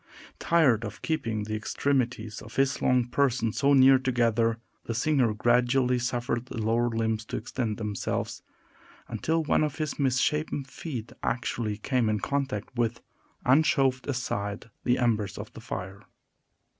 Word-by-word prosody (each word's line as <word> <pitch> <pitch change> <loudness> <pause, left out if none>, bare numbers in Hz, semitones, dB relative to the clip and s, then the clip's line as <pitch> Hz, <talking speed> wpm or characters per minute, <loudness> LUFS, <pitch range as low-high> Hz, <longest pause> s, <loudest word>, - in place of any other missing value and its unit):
Tired 140 -10 +3
of 110 -1 -7
keeping 115 -10 -1
the 110 +1 -5
extremities 115 -1 -1
of 110 - -12
his 135 0 +1
long 125 -1 +3
person 125 -3 +1
so 140 -1 +3
near 135 -1 +7
together, 115 -3 +1 0.3
the 115 - -3
singer 130 -2 +2
gradually 125 +2 +3
suffered 120 0 -2
the 130 - -7
lower 115 +2 +1
limbs 110 -1 -1
to - - -4
extend 110 -1 -3
themselves, 105 -3 -3 0.7
until 160 0 0
one 155 - +2
of 150 -1 -1
his 155 -3 -3
misshapen 140 +2 +1
feet 130 -4 -7
actually 115 -3 -2
came 120 0 0
in 105 -1 +1
contact 135 -5 -2
with 115 -1 -1 0.4
and 135 +5 +5
shoved 135 -5 +1
aside 105 -5 -3
the 125 +1 +2
embers 110 -6 0
of - - -8
the - - -10
fire. 95 +1 -6
120 Hz, 145 wpm, -27 LUFS, 110-135 Hz, 0.7 s, near